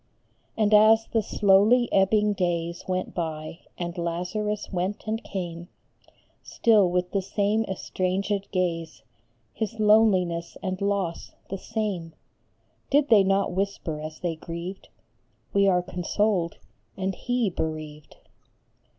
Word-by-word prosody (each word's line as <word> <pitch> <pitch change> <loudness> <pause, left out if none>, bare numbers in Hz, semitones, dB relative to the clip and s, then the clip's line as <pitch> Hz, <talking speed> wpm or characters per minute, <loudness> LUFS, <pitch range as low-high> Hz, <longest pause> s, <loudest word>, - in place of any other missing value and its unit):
And 215 -1 +2
as 220 +1 +6
the 225 - +2
slowly 210 +5 +4
ebbing 210 +2 +3
days 170 -2 -2
Went 185 0 -2
by, 160 -1 -4 0.2
and 175 0 -4
Lazarus 180 +6 -3
went 185 +3 -2
and 220 +1 -2
came 175 -3 -5 0.7
Still 210 -5 +3
with 180 0 -1
the 195 - 0
same 205 +3 0
estranged 190 +1 -2
gaze, 165 -4 -2 0.5
His 220 0 -4
loneliness 190 -6 +3
and 185 +1 -3
loss 200 -4 -2 0.2
the 195 - -3
same, 200 -8 -3 0.8
Did 290 +1 +3
they 215 -4 +7
not 195 +1 +1
whisper 190 -5 -2
as 155 0 -8
they 170 -2 -1
grieved, 170 +4 -7 0.3
" - - -41
We 200 0 +4
are 180 -2 +3
consoled 180 0 -1 0.4
and 190 0 -1
he 245 +1 -1
bereaved 155 -2 -5
190 Hz, 125 wpm, -26 LUFS, 170-210 Hz, 0.8 s, they